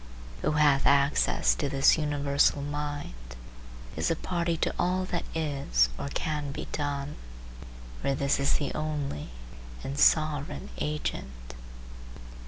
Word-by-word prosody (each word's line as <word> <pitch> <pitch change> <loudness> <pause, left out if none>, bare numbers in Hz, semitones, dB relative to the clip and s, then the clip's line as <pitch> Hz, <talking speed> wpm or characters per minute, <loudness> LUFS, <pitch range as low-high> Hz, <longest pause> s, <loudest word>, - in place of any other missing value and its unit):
Who - - +1
hath 145 -2 +4
access 140 +1 +3
to 145 - -2
this 135 -1 +5
universal 145 -2 +2
mind 145 - -5 0.6
is - - 0
a 165 - +2
party 170 0 -1
to - - 0
all 185 +1 +1
that 175 -2 -3
is 140 - +1
or - - -3
can 150 0 -2
be - - -5
done, 145 -1 -3 0.8
for 135 - +1
this 140 +1 +1
is 140 - +2
the 145 - -1
only 150 - -3 0.5
and 140 +2 -4
sovereign 150 - +2
agent. - - -4
145 Hz, 125 wpm, -28 LUFS, 135-150 Hz, 0.8 s, this